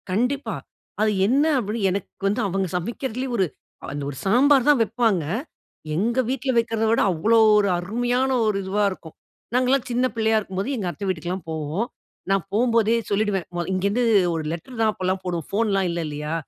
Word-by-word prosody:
கண்டிப்பா, 250 +9 -1 0.5
அது 215 0 +3 0.2
என்ன 270 +6 +3 0.2
அப்படின்னு 210 -2 -1
எனக்கு 195 +1 -5
வந்து, 210 +5 0
அவங்க 195 0 -1
சமைக்கிறதுலேயே 245 +6 -4
ஒரு 190 - +3 0.5
அந்த 145 0 -4
ஒரு 140 - -7
சாம்பார் 260 +6 +4
தான் 290 -4 +5
வைப்பாங்க, 225 -5 +1 0.7
எங்க 230 +8 +1
வீட்ல 260 0 -1
வைக்கிறத 225 -1 +1
விட, 230 - +3
அவ்வளோ 210 +8 +2 0.2
ஒரு 205 -1 +3
அருமையான 245 +8 0 0.2
ஒரு 210 -2 +1
இதுவா 200 +2 0
இருக்கும், 165 -4 -10 0.4
நாங்கள்லாம் 255 +1 +2
சின்ன 245 +2 +2
பிள்ளையா 220 -1 +2
இருக்கும்போது, 195 +4 -4
எங்க 200 -5 -3
அத்தை 200 - -7
வீட்டுக்குலாம் 180 -1 -3
போவோம். 160 +8 -2 0.4
நான் 195 -2 +2
போகும்போதே 230 0 +3
சொல்லிடுவேன். 200 -3 0
மொ 175 - -1
இங்கேருந்து 200 +6 +1 0.3
ஒரு 160 -1 -2
லெட்டர் 225 +9 -7
தான் 220 -1 +3
அப்போலாம் 185 0 -2
போடுவோம், 175 -4 -3
ஃபோன்லாம் 200 -3 +1
இல்லை, 170 0 -2
இல்லையா? 150 +1 -4
210 Hz, 165 wpm, -23 LUFS, 185-235 Hz, 0.7 s, தான்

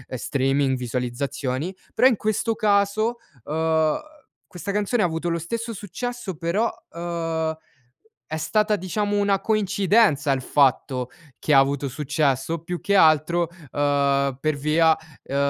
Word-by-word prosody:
streaming, 135 +1 0
visualizzazioni, 125 +6 -3 0.2
però 250 - +5
in 245 -5 +2
questo 215 +2 0
caso, 215 +1 +1 0.3
uhm, 160 0 +1 0.5
questa 180 +3 -6
canzone 210 +3 +1
ha - - +4
avuto 165 0 -2
lo 170 0 -1
stesso 230 +7 -4
successo 215 +1 -5
però, 170 +8 0 0.2
uhm, 165 -1 -2 0.7
è 160 - -3
stata, 210 +7 +1
diciamo, 205 +3 -1
una 200 -1 +2
coincidenza 200 -7 +2
il 135 -1 0
fatto 130 -1 +1 0.3
che 155 - 0
ha 135 - +8
avuto 140 +1 +1
successo 145 +1 0
o 165 -1 -5
più 175 0 -4
che 200 - 0
altro, 160 0 +4 0.2
uhm, 140 -2 +1
per 155 +1 0
via, 155 +3 +3 0.3
uhm, 140 - -6
165 Hz, 135 wpm, -23 LUFS, 140-200 Hz, 0.7 s, ha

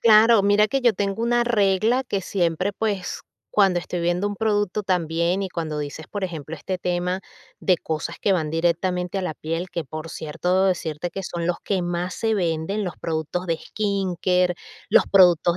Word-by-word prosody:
claro. 225 -1 +7
Mira 205 +1 +4
que 270 +2 0
yo 240 -2 +5
tengo 200 +3 -2
una 240 0 +2
regla 220 +2 +2
que 200 -5 -2
siempre, 180 +1 0
pues, 200 -3 -2 0.3
cuando 195 -4 +4
estoy 175 0 -4
viendo 175 +3 +1
un 205 - -4
producto 205 -2 0
también, 170 +1 0
y 190 - -2
cuando 160 -4 -4
dices, 150 +2 -5
por 200 -2 -3
ejemplo, 160 -2 -6
este 185 +5 -3
tema 180 +1 -1 0.4
de 185 - +3
cosas 155 -1 -4
que 200 - +2
van 160 -5 0
directamente 175 +3 0
a - - -2
la 170 -4 -3
piel, 165 +3 -4
que 170 -2 -3
por 155 +3 -7
cierto, 180 +5 0
decirte 175 -2 -1
que 195 - -5
son 170 -2 -3
los 175 0 0
que 190 -3 0
más 175 +1 -2
se 225 -1 0
venden, 175 +2 -1
los 180 - -4
productos 165 +2 -2
de 165 -2 0
skincare, 185 -3 0 0.4
los - - +6
productos 175 -2 +5
180 Hz, 185 wpm, -23 LUFS, 170-200 Hz, 0.4 s, claro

